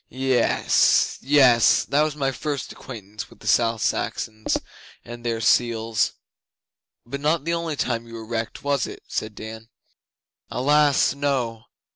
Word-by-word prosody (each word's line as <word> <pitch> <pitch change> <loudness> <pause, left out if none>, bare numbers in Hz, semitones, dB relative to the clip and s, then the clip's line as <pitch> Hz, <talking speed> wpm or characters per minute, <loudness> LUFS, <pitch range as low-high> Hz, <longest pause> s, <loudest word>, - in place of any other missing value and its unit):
Yes 130 -2 +2
yess! 130 -4 +5
That 145 +2 +2
was 155 -1 0
my 135 -2 0
first 145 +2 -4
acquaintance 105 -4 -9
with - - -17
the - - -15
South 115 +1 +2
Saxons 110 0 -1 0.5
and 120 0 -9
their 115 -1 -1
seals.' 115 -1 +2 0.9
'But 140 +4 -6
not 150 +1 +1
the 170 - 0
only 165 -2 -2
time 120 -3 -2
you 115 - -10
were 110 -1 -7
wrecked, 115 0 -4
was 140 -3 0
it?' - - -10
said 110 -1 -4
Dan. 110 +1 -9 0.8
'Alas, 145 +1 +3
no! 130 -6 -2
120 Hz, 140 wpm, -23 LUFS, 115-140 Hz, 0.9 s, yess